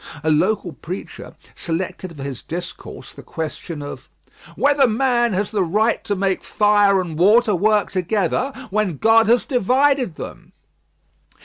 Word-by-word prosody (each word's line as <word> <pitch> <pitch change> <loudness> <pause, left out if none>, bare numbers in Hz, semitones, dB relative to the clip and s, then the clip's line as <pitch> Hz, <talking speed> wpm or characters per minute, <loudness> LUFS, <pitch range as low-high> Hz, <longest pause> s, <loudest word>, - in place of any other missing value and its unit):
A 160 - +2
local 180 +3 +1
preacher 175 +8 -8 0.2
selected 170 -1 -5
for 135 - -7
his 135 -3 -6
discourse 175 +1 -8
the - - -12
question 160 -1 -6
of 145 - -9 0.5
"Whether 280 -1 +3
man 240 0 +1
has 200 +2 -1
the 210 -3 0
right 210 +6 +1
to 205 - -1
make 190 -1 -1
fire 205 -2 +3
and 165 -4 -4
water 215 +4 +4
work 210 +3 +1
together 195 +7 -1 0.2
when 200 -6 0
God 225 +3 +4
had 235 +2 +3
divided 255 - +2
them. - - -10
205 Hz, 140 wpm, -20 LUFS, 175-225 Hz, 0.5 s, water